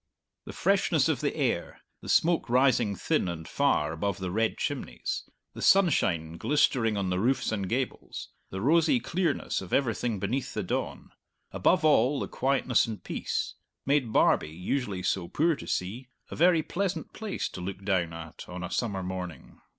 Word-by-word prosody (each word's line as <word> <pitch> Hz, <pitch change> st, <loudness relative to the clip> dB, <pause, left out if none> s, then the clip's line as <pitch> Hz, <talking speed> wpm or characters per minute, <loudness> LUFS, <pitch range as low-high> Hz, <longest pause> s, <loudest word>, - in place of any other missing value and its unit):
The -, -, -8 dB
freshness -, -, +2 dB
of -, -, 0 dB
the -, -, -1 dB
air, -, -, -1 dB, 0.2 s
the -, -, -9 dB
smoke 165 Hz, -5 st, +3 dB
rising 125 Hz, -4 st, +3 dB
thin 90 Hz, -, 0 dB
and 80 Hz, -2 st, -5 dB
far 75 Hz, +1 st, +1 dB
above 100 Hz, +4 st, -2 dB
the 95 Hz, -2 st, -4 dB
red 110 Hz, +3 st, 0 dB
chimneys, -, -, -3 dB, 0.2 s
the -, -, -8 dB
sunshine 85 Hz, -, +3 dB
glistering 115 Hz, -, +2 dB
on 95 Hz, -2 st, -1 dB
the 90 Hz, -, 0 dB
roofs 125 Hz, +4 st, +1 dB
and 100 Hz, -4 st, -2 dB
gables, 130 Hz, +2 st, -3 dB, 0.2 s
the 95 Hz, -, -5 dB
rosy 165 Hz, -, +4 dB
clearness 175 Hz, -, -1 dB
of 95 Hz, -, -9 dB
everything 120 Hz, -3 st, 0 dB
beneath 120 Hz, +8 st, -2 dB
the -, -, -1 dB
dawn -, -, -3 dB, 0.4 s
above 180 Hz, -3 st, +2 dB
all, 145 Hz, -2 st, +4 dB
the -, -, -3 dB
quietness 130 Hz, -3 st, +1 dB
and 110 Hz, -2 st, -6 dB
peace -, -, -3 dB, 0.3 s
made 135 Hz, -4 st, +2 dB
Barbie, 75 Hz, -, +3 dB
usually 95 Hz, -, -3 dB
so 90 Hz, -1 st, 0 dB
poor 160 Hz, -, +2 dB
to -, -, -10 dB
see, 115 Hz, +8 st, -3 dB, 0.2 s
a -, -, -4 dB
very 170 Hz, -1 st, +4 dB
pleasant 195 Hz, +3 st, -3 dB
place 215 Hz, -3 st, -3 dB
to 90 Hz, -, -8 dB
look 95 Hz, +1 st, -6 dB
down 90 Hz, -4 st, +1 dB
at 80 Hz, -2 st, -9 dB
on 90 Hz, 0 st, -6 dB
a 90 Hz, -, -5 dB
summer 100 Hz, -6 st, -1 dB
morning. 90 Hz, -2 st, -7 dB
110 Hz, 170 wpm, -28 LUFS, 90-140 Hz, 0.4 s, rosy